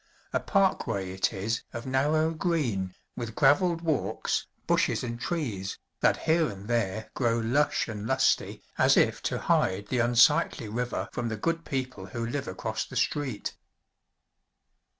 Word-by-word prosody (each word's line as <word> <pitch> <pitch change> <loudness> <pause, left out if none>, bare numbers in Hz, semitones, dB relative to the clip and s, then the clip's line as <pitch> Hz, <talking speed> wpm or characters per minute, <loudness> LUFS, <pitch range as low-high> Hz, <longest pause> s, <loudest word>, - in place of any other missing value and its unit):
A - - +2
parkway 115 - +1
it 95 0 0
is 110 +4 -2
of 120 - -6
narrow 150 +5 +2
green, 130 - -1 0.2
with 115 -2 -5
graveled 165 +5 +4
walks, 155 -6 -1 0.2
bushes - - +2
and 120 -1 -4
trees, 110 - -3 0.2
that - - +3
here 160 -1 +3
and 100 -1 -9
there 110 -3 -1
grow 120 -2 +1
lush 125 +6 +1
and 105 -1 -5
lusty 130 +1 +1 0.2
as - - +5
if - - +3
to - - -1
hide 100 +2 +1
the 125 - 0
unsightly 120 +2 +4
river 120 +3 -2
from 120 -1 -2
the 110 - -3
good 165 +7 -1
people 130 -8 -4
who 115 +4 -4
live 135 +4 -3
across 95 - -3
the - - -11
street. 135 -8 -1
120 Hz, 150 wpm, -28 LUFS, 105-150 Hz, 0.2 s, as